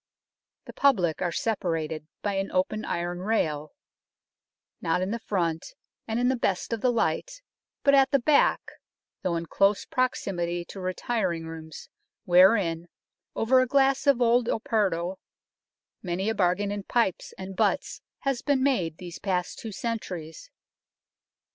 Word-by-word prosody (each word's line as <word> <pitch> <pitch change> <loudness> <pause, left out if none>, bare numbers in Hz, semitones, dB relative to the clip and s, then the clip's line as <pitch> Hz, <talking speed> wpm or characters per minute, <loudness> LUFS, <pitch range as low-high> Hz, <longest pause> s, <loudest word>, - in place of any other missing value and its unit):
The - - -10
public 190 - +2
are 175 -2 0
separated 165 -7 -2 0.2
by 205 - 0
an 195 0 -2
open 185 +4 0
iron 175 +1 -2
rail, 155 -8 -1 1.1
not 165 +2 +1
in 190 - -2
the 235 - -2
front 175 - -2 0.3
and 225 +1 -1
in 245 - +2
the 260 - +2
best 200 -2 -1
of 225 - -3
the 250 - +3
light, - - -1 0.4
but 280 - +5
at 275 -1 +6
the 275 - +4
back, 285 +3 +3 0.6
though 180 -3 -1
in 165 0 -2
close 195 +4 +2
proximity 175 -9 -1
to 195 - -8
retiring 185 -2 -2
rooms, 160 -1 -9 0.4
wherein, 175 -2 +4 0.5
over 255 +3 +4
a 255 - +1
glass 275 +1 +2
of 260 -3 +5
old 240 0 +3
Oporto, 195 -7 0 0.8
many 185 +3 -2
a - - +1
bargain 200 0 +1
in 205 0 -3
pipes 200 -2 0
and 190 0 -7
butts - - 0 0.2
has 275 -3 -1
been 280 -3 +1
made 180 - +1
these 175 -2 -8
past 180 -3 -2
two 225 - -6
centuries. 190 - -5
195 Hz, 145 wpm, -27 LUFS, 175-240 Hz, 1.1 s, at